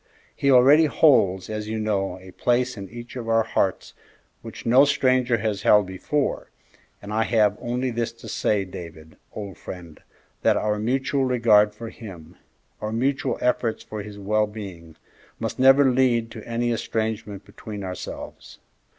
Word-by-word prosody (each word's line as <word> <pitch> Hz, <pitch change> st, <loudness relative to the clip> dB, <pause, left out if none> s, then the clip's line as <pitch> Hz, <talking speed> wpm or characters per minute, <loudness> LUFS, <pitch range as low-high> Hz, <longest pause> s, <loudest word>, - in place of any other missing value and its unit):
He 140 Hz, -, 0 dB
already 135 Hz, +5 st, +6 dB
holds, 100 Hz, -, +3 dB
as 110 Hz, -1 st, -5 dB
you 110 Hz, +1 st, -3 dB
know, 100 Hz, -4 st, -1 dB
a 95 Hz, 0 st, -13 dB
place 125 Hz, +5 st, 0 dB
in 100 Hz, -2 st, -8 dB
each 120 Hz, +1 st, -10 dB
of 120 Hz, -3 st, -5 dB
our 115 Hz, 0 st, +3 dB
hearts 95 Hz, -3 st, -1 dB, 0.5 s
which -, -, -10 dB
no 125 Hz, +4 st, +6 dB
stranger 130 Hz, -4 st, +2 dB
has 105 Hz, -2 st, -2 dB
held 105 Hz, -1 st, +5 dB
before, 95 Hz, +10 st, -2 dB, 0.5 s
and 105 Hz, +1 st, -6 dB
I 110 Hz, -, +1 dB
have 105 Hz, -3 st, +3 dB
only 125 Hz, +2 st, -2 dB
this 115 Hz, 0 st, -2 dB
to 115 Hz, -, -13 dB
say, 100 Hz, -2 st, 0 dB
David, 85 Hz, -3 st, -10 dB, 0.2 s
old 100 Hz, -3 st, -8 dB
friend, 85 Hz, -4 st, -10 dB, 0.4 s
that -, -, +3 dB
our 105 Hz, 0 st, -1 dB
mutual 135 Hz, +4 st, 0 dB
regard 110 Hz, -4 st, +4 dB
for 115 Hz, +1 st, -7 dB
him, 90 Hz, -8 st, -11 dB, 0.5 s
our 105 Hz, -, -3 dB
mutual 135 Hz, +4 st, 0 dB
efforts 120 Hz, -2 st, 0 dB
for 110 Hz, -1 st, -6 dB
his 105 Hz, 0 st, -9 dB
well 105 Hz, +2 st, +1 dB
being, 95 Hz, -7 st, -9 dB, 0.4 s
must -, -, -4 dB
never 135 Hz, +1 st, +6 dB
lead 120 Hz, -3 st, +2 dB
to 110 Hz, -, -9 dB
any 120 Hz, +1 st, -1 dB
estrangement 110 Hz, -2 st, -3 dB
between 105 Hz, -2 st, -8 dB
ourselves. 90 Hz, -1 st, -8 dB
110 Hz, 160 wpm, -24 LUFS, 100-125 Hz, 0.5 s, already